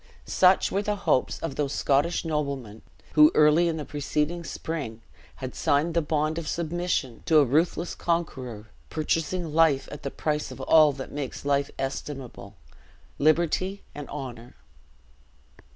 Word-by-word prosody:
Such 185 0 +4
were 195 - +1
the 210 0 -1
hopes 195 -9 +1
of 165 - -3
those 145 -2 -1
Scottish 145 +6 +1
noblemen 140 -8 -3 0.3
who, 150 0 +7
early 150 +3 +5
in 165 -1 -1
the 150 - -5
preceding 150 +3 -2
spring, 140 -10 -5 0.3
had 130 -1 -6
signed 150 +4 +1
the 170 - +2
bond 155 +1 0
of 165 - -7
submission 170 -7 -2
to 160 - +5
a 145 - +6
ruthless 165 +6 +1
conqueror, 130 -11 -3 0.2
purchasing 165 +1 -1
life 155 -4 +3
at 145 - -8
the 140 - -3
price 150 +1 -2
of - - -10
all 155 -2 +6
that 135 0 -8
makes 140 -1 -5
life 140 0 +1
estimable 135 -6 -6 0.6
liberty 170 +6 +1
and 145 -1 -8
honor. 125 -4 -7
150 Hz, 145 wpm, -26 LUFS, 135-165 Hz, 0.6 s, who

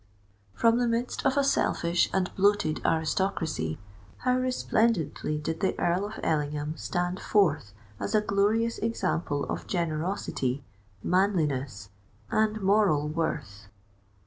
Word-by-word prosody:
From 230 +1 +3
the 245 - +2
midst 235 +1 -1
of 270 - +1
a 280 - +4
selfish 175 -10 +2
and 185 -1 0
bloated 200 -5 +2
aristocracy, 160 - 0 0.4
how 250 0 +1
resplendently 230 - 0
did 160 +2 -3
the 190 - 0
Earl 180 +3 +1
of 215 - -8
Ellingham 150 0 -1
stand 175 +2 -2
forth 155 - +2 0.3
as - - -2
a 215 - +5
glorious 210 +3 +1
example 175 -9 -1
of - - -4
generosity, 155 -5 -2 0.4
manliness, 145 - 0 0.4
and 215 0 +1
moral 190 -7 +3
worth! 140 -10 -3
180 Hz, 120 wpm, -28 LUFS, 150-210 Hz, 0.4 s, a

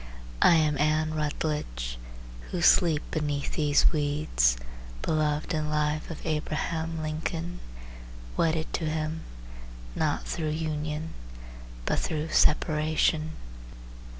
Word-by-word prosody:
I 170 - +7
am 150 -3 +2
Anne 155 +1 +2
Rutledge 145 - -2 0.5
who 180 - -2
sleep 160 -4 +5
beneath 145 -2 -1
these 145 -2 +4
weeds, 145 - +2 0.5
Beloved 155 +1 0
in 155 -1 -1
life 150 0 0
of 165 - -7
Abraham 160 +1 -2
Lincoln, 165 +3 -3 0.8
Wedded 160 -1 0
to 165 - -1
him, 155 +1 -2 0.7
not - - 0
through 160 -2 -2
union, 155 0 -3 0.7
But - - +1
through 155 0 -2
separation. 155 0 +2
155 Hz, 100 wpm, -28 LUFS, 150-160 Hz, 0.8 s, I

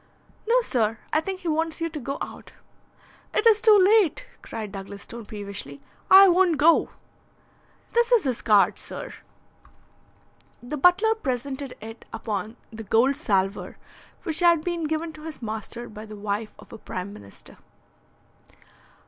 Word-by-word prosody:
"No, - - +4
sir; 225 - 0 0.2
I 310 - +3
think 380 +2 -5
he 355 - -6
wants 320 +1 -1
you 330 - -1
to 315 -2 -6
go 275 +1 -4
out." - - -10 0.8
"It - - +1
is 435 -2 +6
too 435 -2 +7
late," 390 -3 +3
cried 215 -3 -7
Douglas 200 0 -8
Stone 230 -2 -9
peevishly. 200 -9 -7 0.3
"I 390 +1 +10
won't 360 -3 +3
go." 320 +3 +4 1.0
"This 475 +1 +2
is 470 -5 +5
his 255 -3 -2
card, 210 -2 +3
sir." - - -7 1.5
The 245 +5 -5
butler 360 +9 +4
presented 270 - -4
it 225 +1 -10
upon 220 0 -4 0.2
the 225 - -7
gold 230 +6 +2
salver 195 -9 -1 0.5
which 325 -4 0
had 340 -3 +4
been 345 -2 -2
given 315 +1 -2
to 310 - -13
his 320 -2 -7
master 225 +1 -6
by 215 0 -10
the 215 - -9
wife 210 +1 -4
of - - -15
a - - -9
Prime 185 +1 -6
Minister. 100 -1 -14
275 Hz, 150 wpm, -25 LUFS, 215-345 Hz, 1.5 s, I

